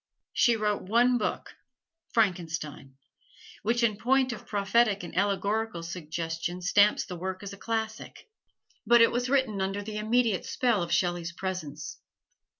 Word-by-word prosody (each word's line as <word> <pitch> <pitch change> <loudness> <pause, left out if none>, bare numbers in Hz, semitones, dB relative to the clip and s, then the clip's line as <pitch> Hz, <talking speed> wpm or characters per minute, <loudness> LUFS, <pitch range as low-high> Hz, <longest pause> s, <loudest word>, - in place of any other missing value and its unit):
She 235 - +4
wrote 210 -2 0
one 240 +5 +3
book, 210 - -3 0.6
"Frankenstein," 165 - -1 0.7
which 235 +3 +1
in 215 -3 +2
point 260 +2 +2
of - - -10
prophetic 205 0 +2
and 175 - -8
allegorical 200 0 0
suggestion 165 +1 -4
stamps 200 +3 +4
the 180 - -7
work 185 +2 -5
as 200 0 -6
classic: 220 +1 -4 0.6
but 235 0 +6
it 230 - +6
was 245 +1 -1
written 260 -8 +1
under 195 +2 -2
the 210 0 -5
immediate 220 -2 +1
spell 240 -7 +1
of 170 - -3
Shelley's 175 -2 0
presence. 160 -5 -5
200 Hz, 140 wpm, -28 LUFS, 175-230 Hz, 0.7 s, but